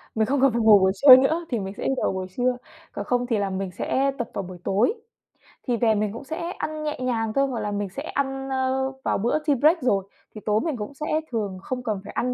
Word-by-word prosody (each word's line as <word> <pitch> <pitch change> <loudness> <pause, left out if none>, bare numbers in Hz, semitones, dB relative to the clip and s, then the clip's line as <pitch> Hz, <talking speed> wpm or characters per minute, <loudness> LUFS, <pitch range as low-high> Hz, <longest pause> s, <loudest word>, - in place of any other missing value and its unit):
mình 220 - +2
không 270 +4 0
cần 270 -2 +5
phải 235 - 0
ngủ 215 -2 +7
buổi 190 0 +3
trưa 255 +4 +10
nữa, 315 +6 +2
thì 235 -4 -1
mình 195 0 -5
sẽ - - -5
đi - - +2
vào - - +1
buổi 185 -1 -4
trưa, 250 0 +1 0.3
còn 205 - -5
không 245 +2 0
thì 230 -3 +1
là 200 -1 -1
mình 190 0 -3
sẽ 270 +9 0
tập 240 - -4
vào 200 - -3
buổi 180 0 -9
tối. 210 - +2 0.7
Thì 240 - +1
về 225 -2 +3
mình 210 0 -1
cũng 235 - -8
sẽ 320 +4 -5
ăn 310 -4 -5
nhẹ 300 -1 -3
nhàng 225 -3 -1
thôi, 275 +2 +2
hoặc 245 -4 -3
là 210 -1 -3
mình 205 -1 -2
sẽ 275 +10 -7
ăn, 270 -2 -3
ơ, 265 0 0
vào - - +1
bữa 235 +9 0
tea 290 - +4
break 315 +2 +4
rồi, 200 -6 +1 0.3
thì 215 - -8
tối 210 0 +2
mình 315 -6 -2
cũng 210 +6 -6
sẽ 300 +2 -6 0.3
thường 205 -5 -2
không 250 +3 -5
cần 215 -5 -2
phải - - -10
ăn 250 +1 -1
245 Hz, 270 wpm, -24 LUFS, 210-270 Hz, 0.7 s, trưa